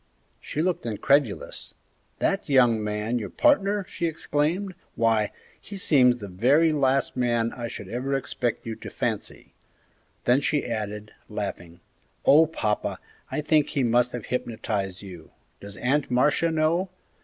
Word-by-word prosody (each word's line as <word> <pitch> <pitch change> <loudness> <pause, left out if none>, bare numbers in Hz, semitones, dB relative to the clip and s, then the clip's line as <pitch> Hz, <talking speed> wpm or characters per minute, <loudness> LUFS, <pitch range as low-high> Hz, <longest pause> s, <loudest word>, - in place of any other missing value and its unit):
She 155 - -3
looked 180 -8 -1
incredulous. 115 +1 0 0.4
"That - - -1
young 120 -5 +4
man 105 +3 -1
your 105 - -5
partner!" 205 -10 +2
she 170 - -2
exclaimed; 165 +4 -1 0.2
"why, 115 -2 +2 0.3
he 200 - -8
seems 130 -9 +4
the 105 -4 -8
very 135 - +3
last 135 -2 +1
man 120 -2 +1
I 120 -2 -5
should 100 - -8
ever 125 +6 -2
expect 125 -3 -2
you 115 -1 -4
to - - -8
fancy!" - - -4 0.7
Then 125 +3 +4
she 145 +1 0
added, 105 -2 -4 0.2
laughing, 95 -5 -6 0.4
"Oh, 155 +3 +7
papa, 110 -9 -2 0.3
I - - -2
think 150 -1 +2
he 140 - 0
must 120 +1 +3
have 120 -3 -5
hypnotized 105 -6 -3
you! 90 -5 -11 0.3
Does 100 0 -10
Aunt 135 +3 0
Marcia 145 +6 +2
know? 165 +4 +1
125 Hz, 145 wpm, -25 LUFS, 110-150 Hz, 0.7 s, Oh